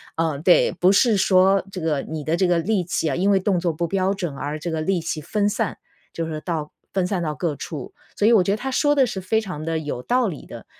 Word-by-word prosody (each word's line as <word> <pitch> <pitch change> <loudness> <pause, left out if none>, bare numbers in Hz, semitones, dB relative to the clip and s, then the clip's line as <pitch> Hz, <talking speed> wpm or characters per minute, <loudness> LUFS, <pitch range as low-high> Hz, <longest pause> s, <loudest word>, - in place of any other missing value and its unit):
呃， 160 -3 -1
对， 175 +3 +4
不 185 +1 +3
是 225 +2 +4
说 190 0 +4
这 185 - -6
个 155 -4 0
你 155 -1 -6
的 160 +3 0
这 185 0 +2
个 175 - +3
力 190 +2 0
气 165 -1 -1
啊， 135 - -1
因 195 +3 +1
为 195 - +4
动 190 -1 +1
作 170 -1 0
不 170 +2 -2
标 190 +2 0
准 175 -7 -4
而 145 +2 -4
这 170 +2 -4
个 160 -1 -2
力 185 +2 0
气 160 -1 -4
分 205 +7 0
散， 205 - -2 0.3
就 165 - -3
是 160 - -5
说 155 - -4
到 160 -4 -3 0.2
分 190 -2 0
散 185 -1 -1
到 155 -3 -2
各 155 0 -2
处。 145 -1 -7 0.2
所 210 - +2
以 235 - +6
我 200 -5 +5
觉 195 - 0
得 205 - +1
他 265 +4 -4
说 290 +2 +2
的 270 -2 +4
是 200 -5 -4
非 220 +4 +1
常 185 -8 -6
地 165 0 -1
有 145 -5 -4
道 245 - +1
理 160 -8 -6
的。 - - -10
180 Hz, 295 characters per minute, -22 LUFS, 160-195 Hz, 0.3 s, 以